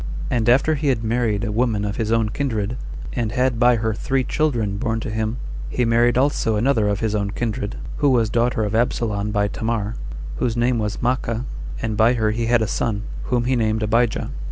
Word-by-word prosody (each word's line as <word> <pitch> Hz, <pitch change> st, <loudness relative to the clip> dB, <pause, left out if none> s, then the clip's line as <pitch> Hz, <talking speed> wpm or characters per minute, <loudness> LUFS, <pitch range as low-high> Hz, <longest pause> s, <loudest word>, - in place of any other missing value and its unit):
And 115 Hz, -1 st, +2 dB
after 135 Hz, +6 st, +4 dB
he 150 Hz, 0 st, -1 dB
had 125 Hz, -5 st, +1 dB
married 110 Hz, -2 st, 0 dB
a 110 Hz, -, -1 dB
woman 110 Hz, -2 st, +1 dB
of 100 Hz, 0 st, -3 dB
his 110 Hz, -1 st, -1 dB
own 115 Hz, -2 st, +2 dB
kindred, 115 Hz, -3 st, -2 dB, 0.4 s
and 115 Hz, -3 st, -1 dB
had 125 Hz, -2 st, +1 dB
by 120 Hz, 0 st, +5 dB
her 110 Hz, 0 st, 0 dB
three 130 Hz, +5 st, 0 dB
children 120 Hz, -10 st, 0 dB
born 115 Hz, 0 st, -1 dB
to 110 Hz, -, -4 dB
him, 110 Hz, +2 st, -2 dB, 0.3 s
he 125 Hz, -, 0 dB
married 120 Hz, +1 st, +3 dB
also 130 Hz, -4 st, +2 dB
another 110 Hz, -1 st, +2 dB
of 100 Hz, -1 st, 0 dB
his 110 Hz, -2 st, 0 dB
own 100 Hz, -1 st, 0 dB
kindred, 105 Hz, -1 st, -3 dB, 0.2 s
who 145 Hz, -, +3 dB
was 120 Hz, -4 st, +3 dB
daughter 120 Hz, -1 st, +1 dB
of 105 Hz, 0 st, -2 dB
Absalom 110 Hz, -3 st, 0 dB
by 105 Hz, -1 st, +1 dB
Tamar, 110 Hz, 0 st, -2 dB, 0.4 s
whose 120 Hz, -2 st, -1 dB
name 120 Hz, 0 st, +2 dB
was 105 Hz, 0 st, -3 dB
Maachah, 120 Hz, -1 st, 0 dB, 0.4 s
and 110 Hz, -2 st, -1 dB
by 110 Hz, +3 st, +4 dB
her 110 Hz, -3 st, +1 dB
he 115 Hz, +1 st, -1 dB
had 120 Hz, -1 st, +3 dB
a -, -, -1 dB
son, 105 Hz, 0 st, -1 dB, 0.2 s
whom 120 Hz, -2 st, +1 dB
he 130 Hz, +2 st, +1 dB
named 110 Hz, -2 st, +1 dB
Abijah. 115 Hz, +1 st, +1 dB
115 Hz, 205 wpm, -22 LUFS, 110-120 Hz, 0.4 s, by